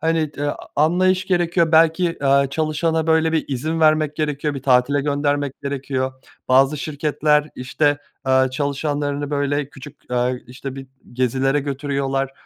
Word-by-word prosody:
hani, 160 Hz, -1 st, 0 dB
t 145 Hz, 0 st, -2 dB, 0.3 s
anlayış 185 Hz, +5 st, +2 dB
gerekiyor 175 Hz, -2 st, +1 dB
belki, 165 Hz, 0 st, +3 dB
aaa, 140 Hz, 0 st, +4 dB
çalışana, 160 Hz, +2 st, 0 dB
böyle, 160 Hz, 0 st, +2 dB
bir 160 Hz, -, +1 dB
izin 155 Hz, +5 st, -2 dB
vermek 155 Hz, -1 st, +3 dB
gerekiyor, 150 Hz, -1 st, -2 dB
bir 135 Hz, -, -6 dB
tatile 130 Hz, +2 st, +3 dB
göndermek 145 Hz, -1 st, -1 dB
gerekiyor. 135 Hz, -1 st, -2 dB, 0.4 s
Bazı 135 Hz, +3 st, +4 dB
şirketler, 150 Hz, 0 st, 0 dB
işte, 145 Hz, +3 st, 0 dB, 0.3 s
aaa, 130 Hz, 0 st, +3 dB
çalışanlarını, 145 Hz, +1 st, -2 dB
böyle, 145 Hz, 0 st, -1 dB
küçük, 145 Hz, -1 st, -14 dB
aaa, 125 Hz, 0 st, +1 dB, 0.2 s
işte, 130 Hz, +2 st, -8 dB
bir 135 Hz, -1 st, -8 dB, 0.3 s
gezilere 130 Hz, +3 st, +1 dB
götürüyorlar, 135 Hz, -1 st, -2 dB
145 Hz, 135 wpm, -21 LUFS, 135-155 Hz, 0.4 s, aaa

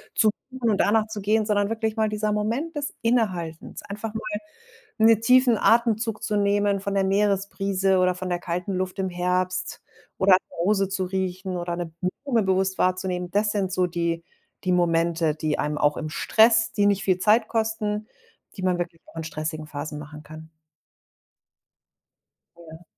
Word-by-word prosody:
zu 220 Hz, -, +4 dB, 0.2 s
suchen 255 Hz, -3 st, -1 dB
und 205 Hz, -, +2 dB
danach 215 Hz, +1 st, +3 dB
zu 215 Hz, -2 st, -6 dB
gehen, 215 Hz, +2 st, +2 dB
sondern 205 Hz, -1 st, +1 dB
wirklich 220 Hz, -1 st, -2 dB
mal 220 Hz, -1 st, +1 dB
dieser 210 Hz, 0 st, -1 dB
Moment 235 Hz, +11 st, -2 dB
des 290 Hz, -1 st, -3 dB
Innehaltens, 185 Hz, -9 st, -1 dB
einfach 210 Hz, +2 st, -6 dB
mal 220 Hz, -, -4 dB, 0.8 s
'ne 225 Hz, -1 st, +6 dB
tiefen 250 Hz, 0 st, +4 dB
Atemzug 225 Hz, -1 st, +2 dB
zu 210 Hz, -, -1 dB
nehmen 200 Hz, 0 st, +2 dB
von 200 Hz, +1 st, -3 dB
der 195 Hz, -, +2 dB
Meeresbrise 195 Hz, -1 st, +1 dB
oder 180 Hz, 0 st, +2 dB
von 185 Hz, 0 st, -5 dB
der 175 Hz, -1 st, -1 dB
kalten 180 Hz, +3 st, -3 dB
Luft 185 Hz, +1 st, -3 dB
im 190 Hz, -1 st, 0 dB
Herbst 180 Hz, +1 st, -1 dB, 0.4 s
oder 190 Hz, 0 st, +5 dB
an -, -, +8 dB
'ner -, -, -13 dB
Rose 195 Hz, -1 st, +2 dB
zu 190 Hz, -1 st, -1 dB
riechen 185 Hz, 0 st, -3 dB
oder 175 Hz, 0 st, -3 dB
'ne 170 Hz, -1 st, -5 dB, 0.3 s
Blume 240 Hz, -6 st, +2 dB
bewusst 190 Hz, 0 st, +1 dB
wahrzunehmen. 185 Hz, -1 st, 0 dB
Das 210 Hz, +2 st, +1 dB
sind 195 Hz, -3 st, -1 dB
so 180 Hz, -1 st, +1 dB
die 170 Hz, -1 st, -2 dB, 0.4 s
die 180 Hz, -, +2 dB
Momente, 165 Hz, -2 st, +1 dB
die 155 Hz, -1 st, -1 dB
einem 150 Hz, 0 st, -1 dB
auch 150 Hz, 0 st, +2 dB
im 155 Hz, -, -4 dB
Stress 225 Hz, +5 st, +3 dB
die 205 Hz, -1 st, +2 dB
nicht 200 Hz, -1 st, +2 dB
viel 185 Hz, -2 st, +2 dB
Zeit 215 Hz, +3 st, +3 dB
kosten, 220 Hz, -2 st, -1 dB, 0.5 s
die -, -, -6 dB
man 180 Hz, -1 st, +2 dB
wirklich 170 Hz, -1 st, -4 dB
auch -, -, -18 dB
in 165 Hz, -, -4 dB
stressigen 155 Hz, 0 st, -5 dB
Phasen 150 Hz, 0 st, -6 dB
machen 150 Hz, 0 st, -10 dB
kann. 155 Hz, +1 st, -11 dB, 2.1 s
Ja. 165 Hz, 0 st, -13 dB
190 Hz, 175 wpm, -24 LUFS, 175-215 Hz, 2.1 s, an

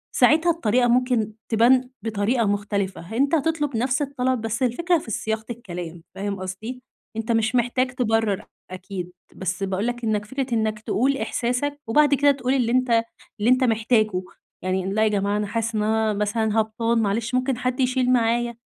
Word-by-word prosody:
ساعتها 325 Hz, +3 st, +4 dB
الطريقة 245 Hz, -6 st, +2 dB
ممكن 240 Hz, -3 st, +1 dB, 0.2 s
تبان 250 Hz, +3 st, +4 dB
بطريقة 225 Hz, +2 st, 0 dB
مختلفة. 200 Hz, -2 st, -2 dB
أنت 280 Hz, +5 st, +3 dB
هتطلب 295 Hz, -4 st, 0 dB
نفس 255 Hz, +4 st, 0 dB
الطلب 260 Hz, -3 st, -1 dB
بس 225 Hz, +3 st, -2 dB
الفكرة 335 Hz, +8 st, +2 dB
في 235 Hz, -8 st, -7 dB
صياغة 220 Hz, +2 st, -2 dB
الكلام 175 Hz, -8 st, -7 dB
فاهم 200 Hz, 0 st, -3 dB
قصدي؟ 215 Hz, +7 st, -6 dB, 0.4 s
أنت 225 Hz, +1 st, -2 dB
مش 225 Hz, 0 st, +1 dB
محتاج 250 Hz, +1 st, +1 dB
تبرّر 225 Hz, -5 st, 0 dB, 0.3 s
أكيد، 185 Hz, -1 st, -6 dB, 0.2 s
بس 185 Hz, +1 st, -3 dB
باقول 195 Hz, +3 st, -1 dB
لك 245 Hz, 0 st, -3 dB
إنّك 210 Hz, -2 st, 0 dB
فكرة 265 Hz, +2 st, -3 dB
إنّك 220 Hz, -1 st, 0 dB
تقول 260 Hz, +5 st, 0 dB
إحساسك 265 Hz, +4 st, -2 dB
وبعد 290 Hz, +5 st, +4 dB
كده 285 Hz, +1 st, +5 dB
تقول 265 Hz, -2 st, -1 dB
اللي 245 Hz, -4 st, +1 dB
أنت 245 Hz, -2 st, +3 dB, 0.4 s
اللي 215 Hz, +4 st, +2 dB
أنت 255 Hz, +1 st, +4 dB
محتاجه. 220 Hz, -4 st, +2 dB, 0.4 s
يعني 185 Hz, 0 st, -1 dB
لأ 215 Hz, +1 st, +2 dB
يا -, -, +4 dB
جماعة 205 Hz, 0 st, 0 dB
أنا 210 Hz, -, -1 dB
حاسس 230 Hz, +1 st, -2 dB
إن 210 Hz, -, +1 dB
أنا 220 Hz, 0 st, +1 dB
مثلًا 210 Hz, +1 st, 0 dB
هبطان 230 Hz, +1 st, 0 dB
معلش 225 Hz, +4 st, -1 dB
ممكن 255 Hz, 0 st, 0 dB
حد 250 Hz, +1 st, -2 dB
يشيل 255 Hz, -1 st, +2 dB
معايا؟ 235 Hz, 0 st, +1 dB
230 Hz, 170 wpm, -23 LUFS, 210-255 Hz, 0.4 s, كده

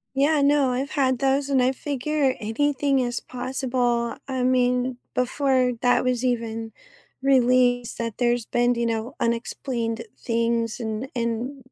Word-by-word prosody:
Yeah, 290 Hz, +2 st, +3 dB
no, 280 Hz, -2 st, +3 dB
I've 270 Hz, +3 st, -2 dB
had 260 Hz, -3 st, +1 dB
those, 275 Hz, +1 st, +1 dB
and 260 Hz, -2 st, +3 dB
I 255 Hz, -, +3 dB
figure 280 Hz, 0 st, -1 dB
anything 275 Hz, +4 st, +1 dB
is 240 Hz, -1 st, -1 dB
possible. 245 Hz, -2 st, -1 dB
I 260 Hz, -2 st, -2 dB
mean, 250 Hz, 0 st, +1 dB, 0.2 s
before 255 Hz, 0 st, +2 dB
that 245 Hz, 0 st, +3 dB
was 255 Hz, 0 st, 0 dB
even 225 Hz, -2 st, -2 dB, 0.5 s
released 250 Hz, -2 st, +3 dB
that 230 Hz, -2 st, -4 dB
there's 240 Hz, -2 st, +1 dB
been, 240 Hz, 0 st, +1 dB
you 235 Hz, 0 st, -1 dB
know, 230 Hz, +3 st, -2 dB
unexplained 235 Hz, 0 st, -2 dB
things, 230 Hz, -1 st, -1 dB
and 220 Hz, +3 st, -3 dB
and 240 Hz, +3 st, -3 dB
250 Hz, 140 wpm, -24 LUFS, 235-265 Hz, 0.5 s, Yeah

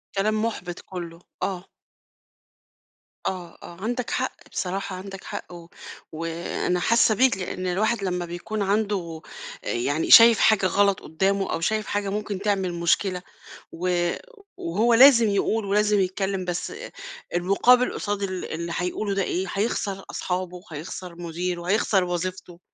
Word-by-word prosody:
كلام 215 Hz, +2 st, +1 dB
مُحبِط 180 Hz, -6 st, -4 dB
كله. 170 Hz, -3 st, -8 dB, 0.2 s
آه. 185 Hz, -2 st, -2 dB, 1.6 s
آه، 180 Hz, -3 st, -5 dB
آه، 170 Hz, -, -10 dB
عندَك 240 Hz, +2 st, -2 dB
حق 255 Hz, 0 st, -1 dB, 0.2 s
بصراحة 185 Hz, 0 st, -3 dB
عندَك 195 Hz, +1 st, -8 dB
حق 180 Hz, -, -7 dB
و 170 Hz, -1 st, -11 dB, 0.4 s
وأنا 165 Hz, +2 st, -2 dB
حاسّة 225 Hz, +2 st, +4 dB
بيك؛ 255 Hz, -4 st, +3 dB
لأن 185 Hz, 0 st, -4 dB
الواحد 205 Hz, +3 st, 0 dB
لمّا 180 Hz, -2 st, -1 dB
بيكون 175 Hz, +5 st, -5 dB
عنده 195 Hz, -5 st, -1 dB, 0.4 s
يعني 145 Hz, +6 st, -1 dB
شايف 230 Hz, -1 st, +10 dB
حاجة 210 Hz, -3 st, +4 dB
غلط 200 Hz, +1 st, +3 dB
قدّامه 195 Hz, +4 st, 0 dB
أو -, -, -2 dB
شايف 215 Hz, +5 st, 0 dB
حاجة 205 Hz, -1 st, -1 dB
ممكن 205 Hz, -1 st, -3 dB
تعمل 195 Hz, -3 st, 0 dB
مشكلة 180 Hz, +2 st, +1 dB, 0.5 s
و 175 Hz, 0 st, 0 dB, 0.4 s
وهو 215 Hz, +8 st, +1 dB
لازم 235 Hz, -2 st, +8 dB
يقول 205 Hz, +2 st, 0 dB
ولازم 210 Hz, +1 st, +2 dB
يتكلِم 190 Hz, 0 st, -1 dB
بس 175 Hz, -1 st, -3 dB, 0.6 s
المُقابل 220 Hz, +8 st, +4 dB
قصاد 205 Hz, -1 st, -3 dB
ال 185 Hz, -2 st, -3 dB
اللي 170 Hz, +1 st, -4 dB
هيقوله 190 Hz, +3 st, -2 dB
ده 195 Hz, -, +1 dB
إيه؟ 185 Hz, +2 st, -2 dB
هيخسر 195 Hz, -2 st, -1 dB
أصحابه 180 Hz, -1 st, -3 dB
وهيخسر 170 Hz, +3 st, -7 dB
مديره، 175 Hz, +1 st, -4 dB
هيخسر 200 Hz, -2 st, +3 dB
وظيفته. 180 Hz, 0 st, -4 dB
190 Hz, 135 wpm, -25 LUFS, 175-205 Hz, 1.6 s, شايف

